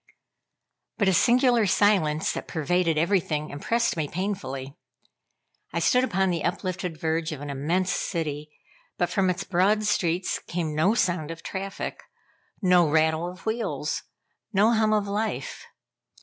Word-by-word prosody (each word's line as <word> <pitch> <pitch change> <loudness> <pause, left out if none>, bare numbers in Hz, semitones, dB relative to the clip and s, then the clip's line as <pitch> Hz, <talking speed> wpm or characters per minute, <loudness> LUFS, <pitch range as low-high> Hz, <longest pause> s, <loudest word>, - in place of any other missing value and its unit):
But 200 - +2
a - - +3
singular 240 +1 +4
silence 185 -6 +2
that - - -5
pervaded 165 +1 0
everything 155 -3 0
impressed 230 +11 0
me 155 -3 -1
painfully. 140 -8 -4 1.0
I - - -4
stood 250 0 +3
upon 190 -6 +1
the 170 -3 -2
uplifted 180 -2 -3
verge 160 0 -1
of 155 - -5
an 145 0 -5
immense 165 +7 0
city, 150 -4 -3 0.5
but 175 - 0
from 190 -2 +2
its 180 +2 -1
broad 200 +4 +2
streets 180 -3 0
came 165 -3 -3
no 170 +9 +2
sound 175 -8 0
of 165 0 -8
traffic, 195 0 -5 0.6
no 180 -3 +5
rattle 160 +2 +2
of 180 +1 -12
wheels, 225 +1 -2 0.5
no 210 +2 +4
hum 220 -1 +2
of 210 -1 +1
life. 210 +2 -3
180 Hz, 140 wpm, -26 LUFS, 160-200 Hz, 1.0 s, no